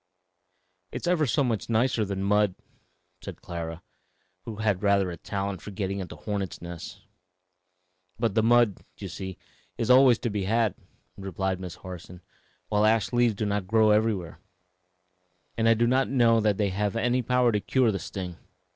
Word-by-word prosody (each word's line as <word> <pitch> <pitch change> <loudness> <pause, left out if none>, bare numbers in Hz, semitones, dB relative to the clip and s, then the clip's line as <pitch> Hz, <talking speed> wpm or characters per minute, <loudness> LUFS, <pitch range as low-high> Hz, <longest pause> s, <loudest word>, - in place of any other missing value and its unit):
"It's - - -5
ever 175 -4 +2
so 140 +4 +2
much 115 -5 -2
nicer 115 0 +2
than 95 -1 -3
mud," 105 -1 +2 0.7
said - - -8
Clara, 85 -1 -6 0.6
who 115 - -6
had 105 -3 0
rather 100 -3 +2
a - - -6
talent 100 0 -4
for - - -8
getting 100 -1 -3
into 95 - -6
hornets' 100 -3 -4
nests. 85 -1 -8 1.2
"But 115 -2 0
the 110 - +3
mud, 120 -2 +3 0.2
you - - -6
see, 95 -1 -7 0.4
is 115 +1 +1
always 125 -2 +7
to 120 -1 -3
be 100 -2 -2
had," 110 -1 +1 0.4
replied 95 -1 -3
Miss 90 -2 -7
Harson, 90 0 -10 0.5
"while 105 0 +1
ash 110 +1 +2
leaves 120 -3 +3
do 105 - -2
not 100 -2 -2
grow 110 +1 +4
everywhere; 105 -5 0 1.2
and 115 0 +2
I 115 - +5
do 115 +2 +2
not 130 +2 +2
know 120 -4 +4
that 105 -2 +1
they 105 -2 +1
have 105 +2 -1
any 120 +2 +1
power 125 0 +2
to 105 - +1
cure 125 +2 +2
the 100 - -3
sting. 90 -3 -6
105 Hz, 170 wpm, -27 LUFS, 95-115 Hz, 1.2 s, always